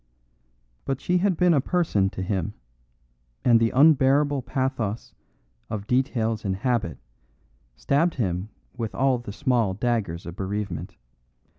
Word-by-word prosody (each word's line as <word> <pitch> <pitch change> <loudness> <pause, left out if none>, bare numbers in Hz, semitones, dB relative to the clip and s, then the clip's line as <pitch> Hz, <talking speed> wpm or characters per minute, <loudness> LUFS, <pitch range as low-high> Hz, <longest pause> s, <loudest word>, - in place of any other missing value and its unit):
But 135 -1 -2
she 180 0 +1
had 190 -2 +1
been 180 -1 +4
a 140 - +3
person 135 - +1
to 95 - -5
him, 95 0 -2 0.9
and 120 -2 +6
the 115 0 +3
unbearable 140 0 +4
pathos 125 -4 -3 0.6
of 105 -2 -4
details 115 -3 0
and 95 -3 -1
habit 110 - -1 0.8
stabbed 155 - +1
him 95 -4 -2 0.3
with 115 -3 -4
all 130 -1 +2
the 120 -4 -8
small 115 -5 +1
daggers 105 -7 -1
of 85 - -7
bereavement. 100 -2 -4
120 Hz, 130 wpm, -25 LUFS, 100-135 Hz, 0.9 s, and